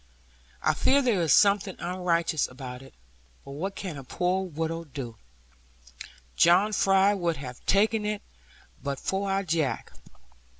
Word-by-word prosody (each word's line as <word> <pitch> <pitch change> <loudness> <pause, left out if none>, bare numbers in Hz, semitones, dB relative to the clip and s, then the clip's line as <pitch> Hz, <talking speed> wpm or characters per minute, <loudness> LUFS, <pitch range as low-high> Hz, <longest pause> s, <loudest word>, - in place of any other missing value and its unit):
I 155 - +3
fear 275 - +3
there 225 -8 +2
is 160 -4 +1
something 200 0 +4
unrighteous 170 -3 0
about 125 -1 -8
it. 135 - -15 0.5
But - - -9
what 185 +8 -4
can 175 -8 -6
a - - -9
poor 180 +7 -1
widow 165 0 -3
do? 130 -7 -8 1.2
John 185 +5 +4
Fry 195 0 +4
would 175 -5 -1
have 125 -3 -9
taken 215 +2 +3
it, 210 0 -3 0.6
but 140 -1 -3
for 195 +1 -2
our 195 +1 0
Jack. 160 -6 -1
175 Hz, 140 wpm, -27 LUFS, 145-195 Hz, 1.2 s, something